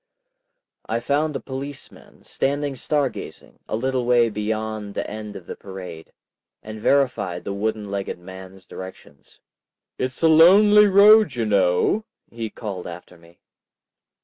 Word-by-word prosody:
I 115 +1 0
found 145 +5 -1
a - - -2
policeman, 135 +1 -9
standing 140 0 -2
star 145 +2 0
gazing, - - -10
a - - -1
little 130 +2 -1
way 120 -1 +3
beyond 110 -1 -4
the - - -3
end 105 -1 -7
of 90 - -9
the - - -7
parade, 90 -4 -10 0.5
and 110 0 -8
verified 125 -9 0
the 100 - -4
wooden 105 0 -3
legged 100 -2 -4
man's 95 +1 -12
directions. 95 -6 -12 0.6
"It's 130 +5 -4
a - - +6
lonely 205 +6 +7
road, 205 - +6
you 115 -2 -1
know," 100 - +2 0.3
he 115 -1 -5
called 100 -5 -7
after 90 0 -10
me. 85 +1 -21
110 Hz, 140 wpm, -22 LUFS, 95-140 Hz, 0.6 s, lonely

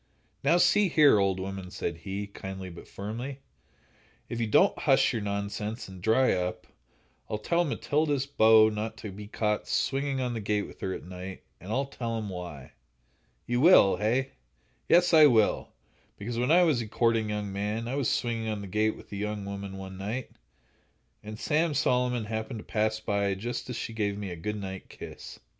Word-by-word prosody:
"Now, 155 +5 +4
see 200 +2 +4
here, 150 -9 +6
old 95 -1 +1
woman," 95 -1 -5
said 85 -2 -4
he, 100 +4 -5
kindly, 95 -2 -7
but 85 - -11
firmly; 120 +7 -6 0.9
"if 120 - -4
you 115 - 0
don't 105 - +4
hush - - +3
your 115 - -2
nonsense 105 +2 -3
and 95 -2 -11
dry 115 +6 +3
up, 90 0 -3 0.6
I'll 105 - -1
tell 170 +11 +1
Matilda's 145 -2 0
beaux 110 -5 +6
not 110 +1 -4
to 105 -1 -7
be 105 +2 -9
caught 105 -1 -1
swinging 135 0 0
on 125 -2 -1
the 115 - -3
gate 105 0 0
with - - -13
her 95 - -2
at - - -5
night, 90 +1 -8 0.2
and 95 +5 -8
I'll 135 +4 +1
tell 115 -4 -4
'em 110 -2 -4
why." 90 -8 -7 0.7
"You 120 +1 0
will, 135 - +7
hey?" 125 +6 0 0.6
"Yes, 175 0 +5
I 155 -2 +9
will; 110 -6 +2 0.5
because 115 +3 -4
when 125 - +1
I 175 +3 +6
was 150 -8 +2
a 115 - -5
courting 115 0 +1
young 105 -2 -3
man, 105 +3 -2
I 125 - -3
was 140 -3 0
swinging 115 -2 -1
on 105 -2 -2
the - - -6
gate 110 +3 +1
with - - -15
a 100 - -5
young 105 0 -3
woman, 100 -1 -6
one 95 0 -8
night, 110 +6 -4 0.9
and 105 0 -8
Sam 155 0 +1
Solomon 125 -3 +1
happened 110 +2 -4
to 105 - -9
pass 110 0 0
by 100 -2 0
just 120 +6 -5
as 125 - -4
she 115 - -4
gave 100 -2 -1
me 100 -3 -5
a - - -5
good 105 +6 -4
night 95 -1 -7
kiss." - - -10
110 Hz, 190 wpm, -28 LUFS, 100-125 Hz, 0.9 s, I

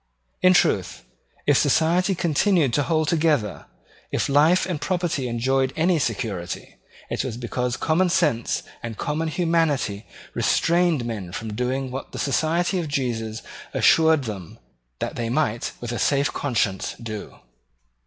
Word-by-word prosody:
In 185 0 +6
truth, 95 - +1 0.4
if 145 -2 +4
society 170 +6 +2
continued 170 - +2
to 145 - +3
hold 155 +1 +1
together, 150 - +1 0.4
if - - 0
life 155 +6 +4
and 175 -6 -3
property 175 -7 -1
enjoyed 130 +3 +1
any 165 +1 +2
security, 100 - -3 0.3
it - - -1
was 125 -4 -4
because 125 +1 -2
common 175 +3 +2
sense 120 -10 +1 0.2
and 115 -2 -6
common 155 +2 -2
humanity 160 - 0 0.3
restrained 170 -6 +2
men 105 -7 -5
from 110 +3 -5
doing 130 +3 -2
what 135 +1 -6
the - - -5
Society 170 +6 +1
of 165 - -3
Jesus 115 -6 -2 0.3
assured 160 -3 +5
them 100 -8 -7 0.4
that - - -4
they 115 -1 -2
might 120 -3 0
with 120 -1 -5
a 120 - -3
safe 140 0 +2
conscience 110 -8 -1
do. 110 -3 -7
140 Hz, 140 wpm, -23 LUFS, 115-165 Hz, 0.4 s, In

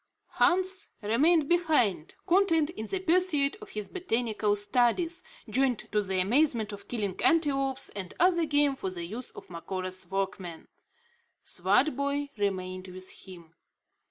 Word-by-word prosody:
Hans 375 +1 +2
remained 290 +9 +3
behind, 300 - +1
content 340 -4 +3
in 220 -8 -6
the 385 - -2
pursuit 350 -5 +2
of 425 - -10
his 210 -1 -5
botanical 225 - 0
studies, 250 - +1 0.2
joined 250 +2 +2
to 210 - +2
the 190 -2 -1
amusement 225 +1 +2
of 200 0 -10
killing 205 -6 -3
antelopes, 275 -5 +1
and 190 -3 -6
other 345 -1 +4
game 290 -2 +3
for 190 - -4
the 175 -2 -5
use 225 +8 -5
of - - -13
Macora's 185 +1 -5
workmen. 190 -3 -4 0.8
Swartboy 280 - +1
remained 185 -2 -2
with 185 0 -6
him. 170 -3 -12
240 Hz, 130 wpm, -29 LUFS, 190-315 Hz, 0.8 s, other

